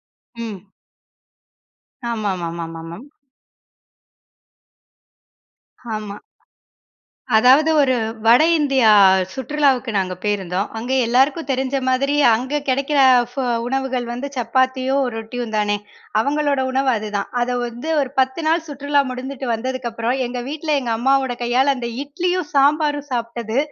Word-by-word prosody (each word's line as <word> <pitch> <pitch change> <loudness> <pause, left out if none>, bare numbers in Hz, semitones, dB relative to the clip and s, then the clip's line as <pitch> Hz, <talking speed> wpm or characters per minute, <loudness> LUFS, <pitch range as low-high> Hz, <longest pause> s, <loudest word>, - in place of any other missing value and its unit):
ம். 215 -5 -9 1.4
ஆமாமாமா. 175 -6 -3 0.2
மேம். 190 +12 -10 2.9
ஆமா. 210 -1 -7 1.2
அதாவது 260 +8 +5
ஒரு 260 -2 +2 0.3
வட 240 +7 +6 0.2
இந்தியா 270 -6 +3 0.5
சுற்றுலாவுக்கு 265 -2 0
நாங்க 185 -1 -1
போயிருந்தோம். 195 -2 -1
அங்கே 245 +4 -2
எல்லாருக்கும் 270 +7 +2
தெரிஞ்ச 265 +1 -1
மாதிரி 275 +3 +1 0.2
அங்க 260 +6 -2
கிடைக்குற 275 +2 +1 0.7
உணவுகள் 260 -2 -2
வந்து 245 +4 -4
சப்பாத்தியும், 260 +3 +1
ரொட்டியும் 225 +1 -5
தானே. 205 0 +1 0.4
அவங்களோட 285 +2 0
உணவு 265 +1 +1
அதுதான். 210 -2 -3
அத 245 +1 0
வந்து 240 +5 -6
ஒரு 270 - -2
பத்து 260 +5 0
நாள் 325 +1 +1
சுற்றுலா 285 0 0
முடிஞ்சுட்டு 260 +1 -6
வந்ததுக்கப்புறம் 240 0 -3
எங்க 245 0 -4
வீட்டுல 305 0 -1
எங்க 240 - -3
அம்மாவோட 265 +1 +1
கையால 260 +4 +2
அந்த 240 -1 -4
இட்லியும், 350 +3 -2
சாம்பாரும் 290 +1 +2
சாப்புட்டது 235 -1 -3
255 Hz, 105 wpm, -20 LUFS, 230-280 Hz, 2.9 s, வட